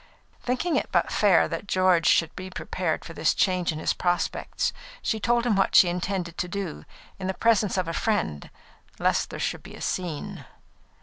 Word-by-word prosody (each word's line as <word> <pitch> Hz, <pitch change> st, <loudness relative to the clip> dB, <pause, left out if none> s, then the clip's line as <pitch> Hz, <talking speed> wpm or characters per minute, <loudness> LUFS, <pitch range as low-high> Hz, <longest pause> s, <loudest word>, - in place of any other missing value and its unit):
Thinking 255 Hz, +8 st, 0 dB
it -, -, -2 dB
but -, -, +2 dB
fair 195 Hz, -6 st, +4 dB
that 165 Hz, +5 st, -5 dB
George 185 Hz, -3 st, +3 dB
should 165 Hz, -1 st, +3 dB
be 185 Hz, 0 st, -7 dB
prepared 180 Hz, -2 st, -3 dB
for 165 Hz, -, -8 dB
this -, -, +1 dB
change 185 Hz, -3 st, +1 dB
in 155 Hz, -, -5 dB
his 155 Hz, -, 0 dB
prospects, 175 Hz, -1 st, -1 dB, 0.3 s
she 220 Hz, -, 0 dB
told 240 Hz, +2 st, +1 dB
him 230 Hz, -4 st, +2 dB
what 195 Hz, -, +2 dB
she 180 Hz, -, +8 dB
intended 180 Hz, -1 st, -3 dB
to 180 Hz, -, -1 dB
do, 185 Hz, -3 st, -5 dB, 0.3 s
in 185 Hz, -, -3 dB
the 190 Hz, -, -2 dB
presence 215 Hz, -3 st, +2 dB
of 185 Hz, -2 st, 0 dB
a 165 Hz, -, -3 dB
friend, 180 Hz, -, -1 dB, 0.5 s
lest -, -, +1 dB
there -, -, -7 dB
should -, -, -2 dB
be -, -, -11 dB
a -, -, -11 dB
scene. 175 Hz, -5 st, -3 dB
185 Hz, 190 wpm, -26 LUFS, 170-200 Hz, 0.5 s, she